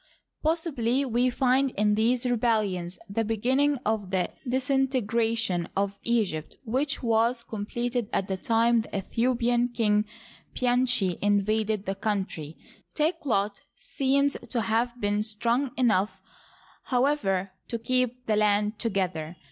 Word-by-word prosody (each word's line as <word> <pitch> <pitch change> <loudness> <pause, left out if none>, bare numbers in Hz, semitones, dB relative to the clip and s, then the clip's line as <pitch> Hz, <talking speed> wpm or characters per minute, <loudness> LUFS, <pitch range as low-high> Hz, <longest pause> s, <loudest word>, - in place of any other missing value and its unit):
Possibly 280 -6 0
we 245 0 +2
find 265 +2 +2
in 210 0 +3
these 235 +4 +2
rebellions 215 -7 0
the 205 +3 -1
beginning 260 +7 +1
of 215 -3 -1
the 185 -1 0 0.2
disintegration 235 -7 0
of 200 0 -1
Egypt 205 -10 -1
which 265 +5 -1
was 235 +1 +2
com 210 -3 -6
pleted 240 -1 -2
at 195 - 0
the 190 - -1
time 230 +3 +2
the - - -10
Aethiopian 240 +4 0
king 210 -2 +2 0.5
Pianchi 245 -7 +2
invaded 205 +1 +1
the 195 - -1
country. 195 -7 -3 0.4
Takelot 275 - 0
seems 280 +1 +1
to 235 - 0
have 235 +2 0
been 205 0 +1
strong 235 +5 0
enough, 220 -6 +2 0.7
however, 245 -8 +1 0.2
to 230 - -2
keep 250 +1 -1
the 215 -2 +1
land 210 0 +2
together. 185 -7 -2
225 Hz, 125 wpm, -27 LUFS, 205-250 Hz, 0.7 s, in